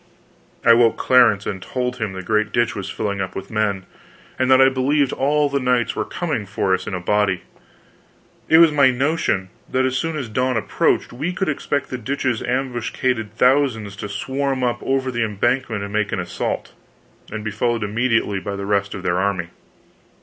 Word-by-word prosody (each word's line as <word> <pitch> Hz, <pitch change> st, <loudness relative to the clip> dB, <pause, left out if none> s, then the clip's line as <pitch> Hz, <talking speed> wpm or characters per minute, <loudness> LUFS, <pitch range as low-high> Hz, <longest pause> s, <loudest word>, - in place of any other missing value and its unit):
I 115 Hz, -, +8 dB
woke 115 Hz, -1 st, +4 dB
Clarence 115 Hz, -6 st, +4 dB
and 95 Hz, -2 st, -4 dB
told 125 Hz, +3 st, -3 dB
him 110 Hz, -4 st, -3 dB
the 95 Hz, 0 st, -6 dB
great 110 Hz, +2 st, +1 dB
ditch 120 Hz, +1 st, +1 dB
was 95 Hz, -1 st, -5 dB
filling 100 Hz, -2 st, -3 dB
up 95 Hz, -1 st, -4 dB
with 95 Hz, 0 st, -7 dB
men, 105 Hz, -3 st, -1 dB, 0.5 s
and 130 Hz, 0 st, +1 dB
that 130 Hz, 0 st, +6 dB
I 135 Hz, -, +7 dB
believed 135 Hz, +1 st, +1 dB
all 145 Hz, +2 st, +2 dB
the 140 Hz, 0 st, -1 dB
knights 125 Hz, -2 st, +1 dB
were -, -, -1 dB
coming 150 Hz, -, -3 dB
for 95 Hz, -1 st, 0 dB
us 95 Hz, -, -1 dB
in 105 Hz, -, -3 dB
a -, -, -3 dB
body. 100 Hz, 0 st, +1 dB, 1.1 s
It 160 Hz, -, +7 dB
was 165 Hz, -1 st, +7 dB
my 140 Hz, -3 st, +5 dB
notion 130 Hz, -, 0 dB, 0.2 s
that 130 Hz, 0 st, +1 dB
as 130 Hz, 0 st, 0 dB
soon 165 Hz, +3 st, -1 dB
as 135 Hz, -5 st, -4 dB
dawn 125 Hz, +2 st, 0 dB
approached 110 Hz, -, 0 dB
we 150 Hz, +9 st, -3 dB
could 190 Hz, -2 st, -1 dB
expect 140 Hz, -1 st, -2 dB
the 130 Hz, -, -3 dB
ditch's 130 Hz, -1 st, -1 dB
ambuscaded 125 Hz, -3 st, -2 dB
thousands 125 Hz, -6 st, +2 dB
to 105 Hz, +1 st, -6 dB
swarm 135 Hz, +5 st, -2 dB
up 120 Hz, -1 st, 0 dB
over 135 Hz, -1 st, 0 dB
the 120 Hz, -1 st, 0 dB
embankment 115 Hz, +1 st, -1 dB
and 100 Hz, 0 st, -6 dB
make 105 Hz, -1 st, 0 dB
an -, -, -1 dB
assault, 90 Hz, -, -3 dB, 0.6 s
and 110 Hz, 0 st, -5 dB
be 105 Hz, -, -3 dB
followed 115 Hz, +1 st, 0 dB
immediately 115 Hz, -2 st, 0 dB
by 100 Hz, +1 st, -5 dB
the 100 Hz, 0 st, -5 dB
rest 100 Hz, -1 st, 0 dB
of 95 Hz, -, -7 dB
their 90 Hz, +1 st, +1 dB
army. 95 Hz, -3 st, -1 dB
120 Hz, 195 wpm, -21 LUFS, 100-130 Hz, 1.1 s, I